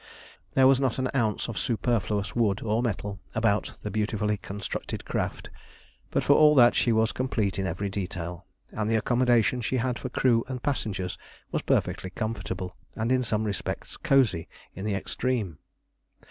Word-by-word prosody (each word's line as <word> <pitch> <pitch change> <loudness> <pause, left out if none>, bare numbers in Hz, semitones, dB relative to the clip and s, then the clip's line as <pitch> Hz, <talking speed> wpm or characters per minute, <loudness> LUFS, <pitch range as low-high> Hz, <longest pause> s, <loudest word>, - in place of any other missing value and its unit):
There 130 - +6
was 135 0 +6
not 135 -4 +1
an 130 -1 0
ounce 110 -6 0
of 115 - -4
superfluous 110 -4 0
wood 110 -4 +1
or 110 +1 +1
metal 100 -4 -2 0.2
about 110 -3 +1
the 105 - -3
beautifully 105 0 0
constructed 100 +1 -5
craft, - - -3 0.6
but - - 0
for 145 - +5
all 150 0 +6
that 120 -3 +7
she 120 - +2
was 110 -1 +3
complete 105 -6 -1
in 95 - 0
every 100 +1 -2
detail, 90 -2 -5 0.2
and 110 0 -2
the 115 - +3
accommodation 120 +1 +3
she 130 +3 0
had 125 0 -1
for 130 - -4
crew 120 -2 +3
and 125 -2 -5
passengers 105 -10 -2 0.3
was - - 0
perfectly 95 - 0
comfortable, 95 -1 -4 0.2
and 115 +2 -1
in 130 0 +3
some 110 -2 0
respects 105 -3 -3
cosy 125 - +2 0.2
in 95 - -6
the 105 -2 0
extreme. 105 - -2
110 Hz, 165 wpm, -27 LUFS, 100-125 Hz, 0.6 s, that